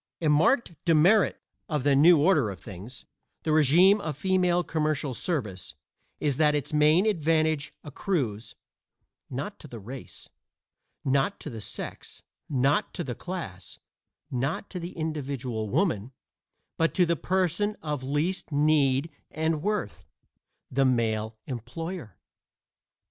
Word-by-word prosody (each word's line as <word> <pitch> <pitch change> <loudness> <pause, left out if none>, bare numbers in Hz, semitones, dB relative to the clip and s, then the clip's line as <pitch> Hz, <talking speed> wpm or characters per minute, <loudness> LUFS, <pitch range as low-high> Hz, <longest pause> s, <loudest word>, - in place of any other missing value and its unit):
A 160 - +1
marked 170 - +3
demerit 175 +6 +4 0.3
of 150 -5 -1
the 140 -1 +4
new 165 +5 +7
order 150 - +3
of 95 -3 -7
things 105 +6 -10 0.4
the 155 - 0
régime 165 +7 +6
of 155 -8 -4
female 180 -1 +2
commercial 150 -4 -1
service 110 - -3 0.4
is 145 -3 0
that 150 -1 +4
its 150 +1 -3
main 155 +5 +5
advantage 160 -6 +1
accrues, 135 - -3 0.7
not 140 +11 -5
to 155 - -11
the 120 - -9
race, 125 +6 -9 0.8
not 135 +8 +1
to 150 - -6
the 115 -2 -7
sex, - - -7 0.3
not 135 0 +1
to - - -2
the 125 - -4
class, 115 - -7 0.5
not 135 +9 -2
to 185 - -4
the 170 +1 -6
individual 135 -8 -3
woman, 125 - 0 0.6
but 165 0 +1
to 180 - +4
the 170 0 +1
person 190 +4 0
of 150 -3 -2
least 150 +8 -2
need 145 0 +2 0.2
and 160 0 -1
worth 205 - -2 0.7
the 135 +2 +2
male 110 -3 0
employer. 155 - -6
150 Hz, 130 wpm, -27 LUFS, 130-170 Hz, 0.8 s, new